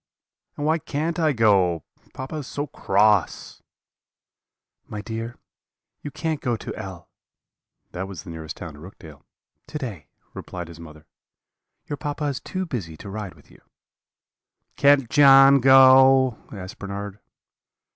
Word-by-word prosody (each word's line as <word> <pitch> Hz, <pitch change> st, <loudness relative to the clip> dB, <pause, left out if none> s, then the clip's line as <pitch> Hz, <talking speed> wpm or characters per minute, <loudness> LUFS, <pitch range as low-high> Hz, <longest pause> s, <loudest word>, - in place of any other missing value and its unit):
And 145 Hz, -, -3 dB
why 160 Hz, +2 st, +2 dB
can't 160 Hz, +4 st, -3 dB
I 155 Hz, -2 st, +3 dB
go? 95 Hz, -, +2 dB, 0.3 s
Papa 135 Hz, +4 st, -6 dB
is 145 Hz, -, -6 dB
so 145 Hz, -, -4 dB
cross.' 105 Hz, -, 0 dB, 1.3 s
"'My 105 Hz, -, -6 dB
dear, 115 Hz, +2 st, -6 dB, 0.6 s
you 145 Hz, -, -6 dB
can't 155 Hz, +1 st, -3 dB
go 120 Hz, -3 st, -1 dB
to -, -, -7 dB
L 95 Hz, -3 st, -9 dB, 0.8 s
(that 95 Hz, +2 st, -5 dB
was 90 Hz, -5 st, -9 dB
the 90 Hz, -, -9 dB
nearest 80 Hz, -1 st, -8 dB
town 85 Hz, -4 st, -8 dB
to 75 Hz, -, -14 dB
Rookdale) 80 Hz, -3 st, -13 dB, 0.5 s
to -, -, -5 dB
day,' 105 Hz, -, -7 dB, 0.3 s
replied 90 Hz, -2 st, -8 dB
his 85 Hz, -1 st, -12 dB
mother; 75 Hz, -2 st, -13 dB, 0.8 s
'your 145 Hz, -, -5 dB
papa 145 Hz, +1 st, -5 dB
is 140 Hz, -2 st, -2 dB
too 185 Hz, 0 st, -5 dB
busy 95 Hz, -, -6 dB
to 100 Hz, -, -9 dB
ride 105 Hz, -3 st, -6 dB
with -, -, -22 dB
you.' -, -, -20 dB, 1.1 s
"'Can't 140 Hz, -3 st, +4 dB
John 135 Hz, 0 st, +7 dB
go?' 130 Hz, -1 st, +6 dB, 0.2 s
asked 95 Hz, -2 st, -9 dB
Bernard. 100 Hz, 0 st, -6 dB
115 Hz, 140 wpm, -23 LUFS, 90-140 Hz, 1.3 s, John